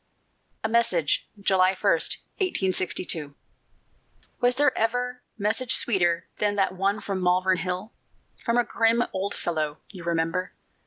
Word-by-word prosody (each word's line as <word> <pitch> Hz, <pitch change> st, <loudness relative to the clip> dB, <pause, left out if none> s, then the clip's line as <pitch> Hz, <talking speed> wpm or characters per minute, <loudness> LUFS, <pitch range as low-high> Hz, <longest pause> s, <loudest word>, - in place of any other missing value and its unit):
A -, -, +1 dB
MESSAGE 220 Hz, -9 st, +1 dB
[July 190 Hz, -1 st, +3 dB
1, 205 Hz, -, +3 dB, 0.5 s
1882] 180 Hz, -, 0 dB, 1.0 s
Was 245 Hz, 0 st, +3 dB
there 290 Hz, -1 st, +3 dB
ever 245 Hz, +2 st, -1 dB, 0.2 s
message 225 Hz, +4 st, +1 dB
sweeter 175 Hz, -6 st, +2 dB
Than 205 Hz, -1 st, +1 dB
that 195 Hz, -1 st, +2 dB
one 195 Hz, +3 st, 0 dB
from 195 Hz, -2 st, -3 dB
Malvern 185 Hz, +1 st, +2 dB
Hill, 180 Hz, +4 st, -4 dB, 0.5 s
From 235 Hz, +1 st, +1 dB
a 245 Hz, -, +4 dB
grim 230 Hz, +1 st, +2 dB
old 195 Hz, +2 st, -2 dB
fellow, 155 Hz, -3 st, -2 dB
you 185 Hz, -4 st, -10 dB
remember? 170 Hz, +2 st, -1 dB
195 Hz, 125 wpm, -25 LUFS, 180-225 Hz, 1.0 s, a